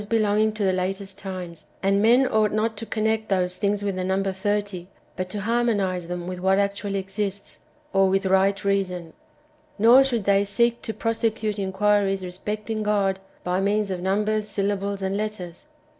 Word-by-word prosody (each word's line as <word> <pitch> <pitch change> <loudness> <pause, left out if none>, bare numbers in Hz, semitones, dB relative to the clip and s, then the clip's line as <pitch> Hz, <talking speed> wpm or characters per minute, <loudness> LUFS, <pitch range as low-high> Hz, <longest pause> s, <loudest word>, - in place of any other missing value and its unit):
213 215 -1 +2
to 215 -1 -3
the 190 -1 +2
latest 190 +1 -3
times; 180 -3 -7 0.2
and 195 +1 +3
men 240 +5 +5
onglit 215 -2 +2
not 220 +1 0
to 225 +2 -7
connect 220 +1 -1
those 180 -2 +1
things 205 0 0
with 200 -2 -1
the 185 - -2
number 190 +1 0
thirty^ 200 -2 -2 0.3
but 185 0 -4
to 205 +1 -4
harmonize 205 -6 0
them 175 0 -4
with 180 0 -5
wdiat 190 +1 +3
actually 200 0 -1
exists, 195 +1 -4 0.3
or 195 0 +4
with 195 +1 +1
right 190 +1 +2
reason. 180 -4 -1 0.6
Nor 235 +5 +7
should 240 -5 -1
they 200 0 +4
j/ - - -1
seek 235 +4 +1
to 220 - -4
prosecute 225 -2 -1
inquiries 195 0 +1
respecting 210 +4 -4
God 200 -2 +1 0.2
by 180 +1 0
means 205 0 +1
of 180 -1 -3
num 195 +3 +1
bers, 215 0 0
syllables/ 200 0 -2
and 190 +1 -1
letters. 210 - -5
200 Hz, 175 wpm, -24 LUFS, 190-215 Hz, 0.6 s, Nor